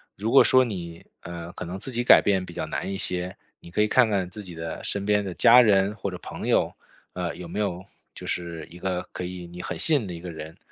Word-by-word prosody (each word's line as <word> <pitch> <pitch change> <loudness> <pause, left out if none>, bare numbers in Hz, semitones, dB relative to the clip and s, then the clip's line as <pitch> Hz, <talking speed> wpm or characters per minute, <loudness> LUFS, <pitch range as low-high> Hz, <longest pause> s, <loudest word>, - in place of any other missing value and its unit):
如 110 +4 -2
果 135 - +8
说 130 0 +6
你， 85 -7 -7 0.2
呃， 85 0 -7
可 - - -6
能 90 +3 -5
自 130 - -2
己 120 0 -1
改 - - +8
变 95 -2 +1
比 85 - -10
较 90 - -2
难 95 - -3
一 95 - -3
些， 90 -1 -2 0.2
你 - - -13
可 95 - -3
以 105 - +4
看 125 0 +4
看 95 -3 0
自 105 +3 -8
己 90 -3 -9
的 80 0 -6
身 100 -1 -1
边 105 -1 +2
的 95 - -4
家 125 +2 +8
人 100 -2 +3
或 100 - -4
者 90 - -6
朋 - - -7
友， - - +2 0.4
呃， 90 -2 -3
有 90 -1 -8
没 85 - -5
有 95 -3 -2 0.3
就 - - -9
是 85 -3 -4
一 90 - -11
个 90 -1 -3
可 90 - -5
以 90 0 -6
你 90 +1 -9
很 - - -5
信 155 -3 +3
任 105 - -6
的 90 - -5
一 - - -8
个 90 -1 -6
人， 80 +1 -9
90 Hz, 285 characters per minute, -25 LUFS, 85-105 Hz, 0.4 s, 果